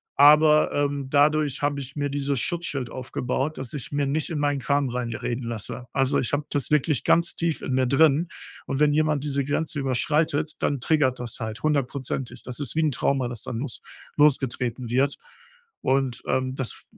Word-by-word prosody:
Aber, 150 +1 +6
ähm, 145 -2 -1
dadurch 145 -1 +3
habe 145 -1 +1
ich 135 0 -7
mir 145 -1 -1
dieses 140 -1 -1
Schutzschild 145 -6 -2
aufgebaut, 130 +3 -3
dass 130 0 -6
ich 145 -1 -6
mir 145 -1 0
nicht 155 +4 -1
in 155 - -2
meinen 145 -1 +1
Kram 140 0 +1
reinreden 120 0 -3
lasse. 115 +2 -5
Also, 135 0 +2
ich 125 - -2
habe 145 0 0
das 145 -3 -1
wirklich 150 -1 +2
ganz 170 0 +3
tief 170 -2 -1
in 130 - -3
mir 130 0 +2
drin. 155 +4 +4 0.4
Und 135 +1 -2
wenn 150 -1 +4
jemand 155 -2 +1
diese 140 -1 0
Grenze 150 +2 -1
überschreitet, 150 +4 0
dann 140 -2 0
triggert 135 -4 +2
das 120 -1 -6
halt 110 0 -5
hundertprozentig. 135 -4 -1
Das 125 +1 -6
ist 140 -3 -2
wie 160 - +2
'n 155 - +2
Trauma, 135 0 0
das 120 -3 -6
dann 115 - -4
los 130 -2 -4 0.4
losgetreten 130 -4 +1
wird. 135 +4 +1 0.6
Und, 130 -2 0
ähm, 130 0 0
das 130 -4 -3
f - - -14
140 Hz, 185 wpm, -25 LUFS, 130-150 Hz, 0.6 s, Aber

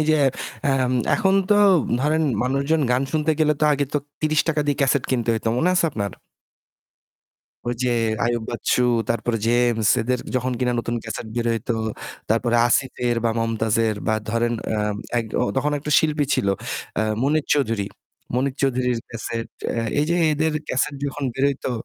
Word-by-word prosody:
এই - - +2
যে, - - +5 0.5
অ্যা 140 - +3 0.4
এখন 190 0 +2 0.2
তো - - +7 0.5
ধরেন 155 +3 +2 0.2
মানুষজন 140 +5 +1
গান 125 +2 +2
শুনতে 155 0 +1
গেলে 150 -1 +4
তো - - +3
আগে 145 0 +1
তো 145 - +2 0.2
৩০ 155 0 +2
টাকা 155 -2 +1
দিয়ে 145 - +1
cassette 135 0 +2
কিনতে 120 -3 0
হইতো। 110 0 -2
মনে 170 - +2
আছে 180 - +3
আপনার? 100 -7 -3 1.5
ঐ - - 0
যে 125 - +1 0.4
আইয়ুব 120 -1 0
বাচ্চু 120 +1 0 0.3
তারপরে 115 0 0
James 120 -2 +2
এদের 125 +2 0 0.2
যখন 130 0 0
কিনা 125 -1 +1
নতুন 120 0 -3
cassette 110 0 -6
বের 120 -1 -1
হইতো, 115 +1 -2 0.6
তারপরে 120 +1 +2
আসিফের 120 -1 +1
বা 115 - +3
মমতাজের 115 -1 +1
বা 110 - +2 0.2
ধরেন, 120 +1 +1 0.2
অ্যা 110 -1 0 0.4
এক 115 - -1 0.2
ও - - +2
তখন 145 +3 +1
১ 140 - -7
টা 150 - 0
শিল্পী 150 -1 +1
ছিল, 100 - 0 0.5
অ্যা 110 - +1 0.2
মনির 150 +2 +1
চৌধুরী। 115 -8 +1 0.5
মনির 130 +1 0
চৌধুরীর 125 -2 +1
cassette, 115 0 -5 0.2
অ্যা 115 -1 -1
এই 150 - +3
যে 170 - +2 0.2
এদের 155 +1 +1 0.2
cassette 140 +2 0
যখন 145 0 -3
বের 135 +3 -1
হইতো, 135 -1 -3
125 Hz, 175 wpm, -22 LUFS, 115-145 Hz, 1.5 s, তো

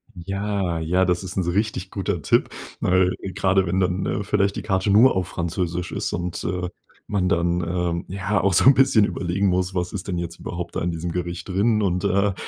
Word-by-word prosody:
Ja, 95 -1 -2
ja, 90 +4 +2
das 90 +1 0
ist 95 0 -7
'n 95 - +2
richtig 95 0 -1
guter 95 -4 -2
Tipp, - - +2 0.3
weil 90 0 +3 0.2
grade 95 0 +2
wenn 90 +2 0
dann, 90 0 +1
ne, 105 - -1
vielleicht 100 0 +1
die - - -3
Karte 95 +1 0
nur 110 +5 +6
auf 90 -2 0
Französisch 85 +1 -3
ist - - -3
und, 90 0 -3
äh, 90 0 -2 0.4
man 95 -3 +1
dann, 85 +1 +1
ähm, 85 0 -2
ja 100 +2 -1
auch 100 - +2
so - - +4
'n 135 - +9
bisschen 130 -6 +4
überlegen 95 +1 -1
muss: 90 0 0
„Was 90 -1 -2
ist 95 -1 -5
denn 90 -3 -2
jetzt 85 0 -5
überhaupt 85 0 -6
da - - -1
in 85 - 0
diesem 85 +1 -4
Gericht 85 0 -4
drin 105 +3 +2
und, 90 -1 0
äh, 100 +1 +2
90 Hz, 210 wpm, -23 LUFS, 85-100 Hz, 0.4 s, n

